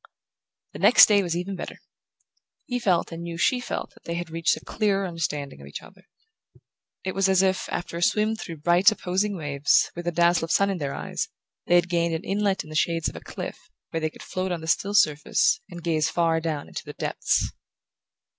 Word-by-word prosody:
The - - -8
next - - +8
day 205 -2 +4
was 170 -3 -2
even 190 +2 -3
better. - - -7 0.9
He 245 0 -2
felt, 185 -8 +1
and 165 0 -6
knew 170 -1 -5
she 250 +9 +2
felt, 245 - -4
that - - -22
they 170 - -3
had 170 -1 -5
reached 165 0 +1
a - - -13
clearer 200 -2 0
understanding 150 - -4
of 70 - -11
each 70 - -8
other. 190 -1 -18 1.0
It 190 - -3
was 195 0 +2
as 190 0 +4
if, 190 -1 0
after 170 - -4
a - - -4
swim 215 +4 +2
through 165 -8 -8
bright 175 +5 +6
opposing 195 0 -1
waves, 145 -3 +2
with 175 0 -6
a - - +2
dazzle 170 0 +3
of 165 - -5
sun 200 0 +3
in 190 - -3
their 140 -2 -3
eyes, - - -3 0.4
they 175 - +4
had 175 0 +4
gained 170 -1 0
an 160 - -4
inlet 200 -2 0
in 155 - -13
the - - -7
shades 165 +1 +1
of - - -14
a - - -6
cliff, - - -8 0.2
where 165 - -2
they 155 - 0
could - - -13
float 185 0 -3
on 170 -2 -3
the 160 - -8
still 200 +5 +1
surface 155 +7 +3
and 175 -1 -9
gaze 160 -2 +1
far 165 -1 +1
down 155 -3 -3
into - - -7
the - - -9
depths. - - 0
175 Hz, 220 wpm, -25 LUFS, 165-195 Hz, 1.0 s, next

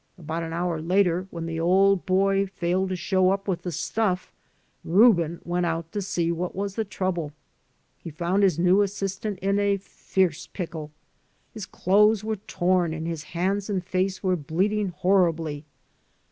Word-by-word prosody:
About 165 -1 -4
an 165 -1 -5
hour 170 -1 -2
later, 180 +1 +1
when 170 -2 -6
the 165 0 -4
old 190 +3 +3
boy 195 +1 +2
failed 185 0 -1
to 185 - -1
show 185 +1 +2
up 195 +1 -1
with 185 -3 -1
the 180 - -4
stuff, 180 +3 -1 0.5
Reuben 175 -4 +4
went 175 0 0
out 165 0 -3
to 205 - -3
see 170 -3 -1
what 175 +1 -3
was 200 0 -3
the 225 - -1
trouble. 185 -6 -3 0.7
He 170 - -8
found 170 +5 0
his 190 -6 +3
new 180 +3 +4
assistant 200 0 -2
in 200 +1 +2
a 200 -1 +2
fierce 185 -3 -2
pickle. 160 -5 -6 0.6
His 215 -3 -7
clothes 210 +3 +3
were 220 0 -2
torn 180 -4 0
and 160 0 -5
his 165 -2 -3 0.2
hands 195 +3 0
and 190 -3 -1
face 185 +1 -1
were 185 -1 +2
bleeding 190 +7 0
horribly. 165 -5 +1
185 Hz, 165 wpm, -25 LUFS, 170-195 Hz, 0.7 s, Reuben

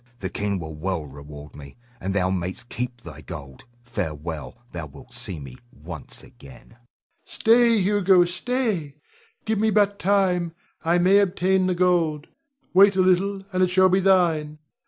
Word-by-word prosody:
The 95 -5 -5
king 100 -1 -2
will 80 -3 -7
well 85 +1 -3
reward 75 +1 -11
me, 70 +4 -12 0.2
and 95 - -3
thou 95 -1 +1
mayst 95 +6 -4
keep 125 0 -5
thy 80 -2 -11
gold. 70 -7 -10 0.2
Farewell! 80 -8 -5
Thou 85 -3 -6
wilt 70 - -15
see 90 -5 -5
me 65 -3 -10
once - - -10
again. 65 +2 -16
Rod. 115 - -22 0.5
Stay, 230 0 +4
Hugo, 190 -2 +4
stay! 185 - -2 0.5
Give 220 -2 0
me 220 +1 +2
but 205 -1 +2
time; 180 -3 +1 0.3
I 170 +1 +2
may 185 +3 +5
obtain 190 -1 +2
the 185 - 0
gold. 170 -4 +1 0.4
Wait 195 +2 +6
a 190 - +3
little, 190 +2 +2
and 185 - +1
it 185 - +4
shall 185 +1 +4
be 185 +1 +3
thine. 170 -6 +2
170 Hz, 160 wpm, -24 LUFS, -, 0.5 s, Wait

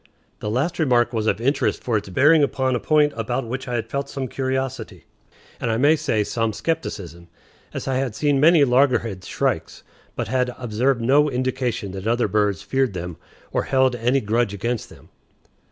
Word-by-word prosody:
The 105 - -4
last 145 +11 -1
remark 125 -5 +2
was 110 -1 -1
of - - +1
interest 135 +5 0
for 120 - 0
its 105 -2 -2
bearing 150 - +5
upon 130 -2 +1
a - - 0
point 150 +1 +3
about 120 +3 -2
which 130 +3 -5
I 125 - -2
had 115 -1 -2
felt 140 +3 -3
some 135 -2 -4
curiosity, 130 - -3 0.5
and, - - -2
I 110 - +1
may 145 +6 +5
say, 110 -8 0
some 115 +1 -1
skepticism, 95 - -4 0.4
as - - -6
I 130 -1 0
had 130 -4 -2
seen 145 0 +1
many 160 +1 +6
loggerhead 120 -7 +2
shrikes, - - -2 0.3
but - - -3
had 125 -1 0
observed 120 +2 0
no 145 +5 +4
indication 125 -5 -2
that 95 +2 -6
other 120 0 +2
birds 105 -3 0
feared 135 -5 0
them 90 -1 -5 0.3
or - - -1
held 130 -2 +2
any 125 +3 +1
grudge 110 0 0
against 115 +3 -3
them. - - -17
125 Hz, 185 wpm, -22 LUFS, 110-135 Hz, 0.5 s, many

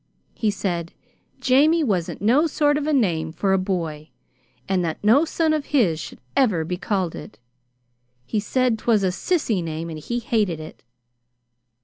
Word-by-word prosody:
He 220 - 0
said 175 -5 -3 0.5
'Jamie' 305 +6 +4
wasn't 190 - -2
no 265 +10 +4
sort 290 -1 +2
of 295 0 -2
a - - +1
name 170 - +1
for 190 +4 0
a 190 - +3
boy, 165 -5 -3 0.6
and 190 -2 +1
that 160 -2 -2
no 245 +10 +5
son 320 -1 +1
of 305 -2 -1
his 200 - +2
should - - -8 0.2
ever 200 -12 +2
be 180 +2 -2
called 185 -2 -2
it. 210 - -10 0.9
He 210 - -1
said 240 +2 0
'twas 215 -4 +2
a 190 - +3
sissy 225 - 0
name, 165 +1 -5
and 155 - -6
he 235 +10 -3
hated 210 -8 0
it. 155 - -10
205 Hz, 165 wpm, -23 LUFS, 170-260 Hz, 0.9 s, no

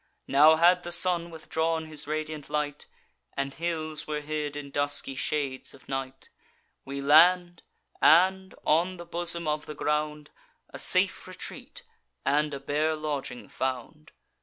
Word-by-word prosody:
Now 150 +3 +6
had 175 +2 +5
the 175 - -7
sun 170 -1 +1
withdrawn 160 0 -2
his 155 -2 -5
radiant 155 -1 -4
light, 150 -1 -3 0.5
And 140 0 -2
hills 155 -2 -3
were 150 -1 -2
hid 150 -1 -3
in 145 -1 -7
dusky 145 -1 0
shades 135 -1 -2
of 135 - -20
night: 135 0 -5 0.5
We 140 +1 -5
land, 175 +4 +5 0.4
and, 190 +3 +4
on 175 +4 +2
the 175 - -9
bosom 170 -1 -2
of 150 0 -2
the 150 - -7
ground, 150 0 -2 0.4
A - - -8
safe - - +2
retreat - - -8 0.4
and 150 +1 +2
a 140 - -5
bare 150 +3 0
lodging 150 -5 -4
found. 130 - -5
150 Hz, 140 wpm, -27 LUFS, 145-165 Hz, 0.5 s, Now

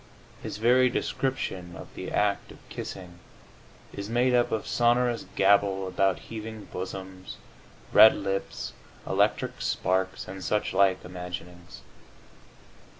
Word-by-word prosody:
His - - -5
very 125 +3 +4
description 95 -9 -2
of - - -11
the - - -6
act 105 -1 0
of - - -13
kissing 90 -2 -7 0.7
is 100 +1 -6
made 125 +2 +2
up 120 -1 +3
of 110 - -1
sonorous 120 0 +2
gabble 95 -1 +3
about 95 0 +1
heaving 110 -1 -8
bosoms, 95 0 -6 0.6
red 110 - +9
lips, 95 0 -3 0.3
electric - - 0
sparks 95 0 -1
and 95 0 -7
such 105 +3 0
like 95 -2 +3
imaginings. 90 -1 -8
95 Hz, 115 wpm, -27 LUFS, 95-115 Hz, 0.7 s, red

